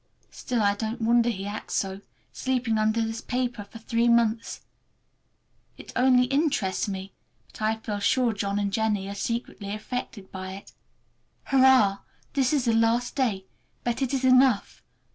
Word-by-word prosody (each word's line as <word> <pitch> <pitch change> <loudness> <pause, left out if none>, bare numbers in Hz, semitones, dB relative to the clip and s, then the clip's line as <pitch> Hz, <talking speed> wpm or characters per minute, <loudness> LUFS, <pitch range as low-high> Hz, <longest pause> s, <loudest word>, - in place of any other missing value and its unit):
Still, 240 -3 -2
I 200 0 +3
don't 220 +3 -4
wonder 235 +1 +4
he 195 -4 -4
acts 205 +1 -5
so, 195 0 -2 0.3
sleeping 250 -4 0
under 220 +1 +2
this 225 0 -4
paper 245 -4 -3
for 215 - -12
three 230 +1 0
months. 235 -1 +1 1.2
It - - -11
only 250 0 +5
interests 270 - 0
me, 195 -1 -6 0.4
but - - -13
I 215 +1 +1
feel 210 -2 -4
sure 240 +3 +2
John 200 0 -2
and 200 -1 -1
Jennie 215 -3 0
are - - -4
secretly 205 -1 -4
affected 215 -3 -6
by 185 0 -6
it. 195 - -11 0.7
Hurrah! 260 -7 +4 0.3
This 265 -2 +2
is 285 -4 +1
the 230 - +2
last 230 +2 +2
day, 215 -8 0 0.4
but 240 +2 -2
it 265 - 0
is 265 -1 0
enough. 255 -4 +3
225 Hz, 160 wpm, -26 LUFS, 205-250 Hz, 1.2 s, only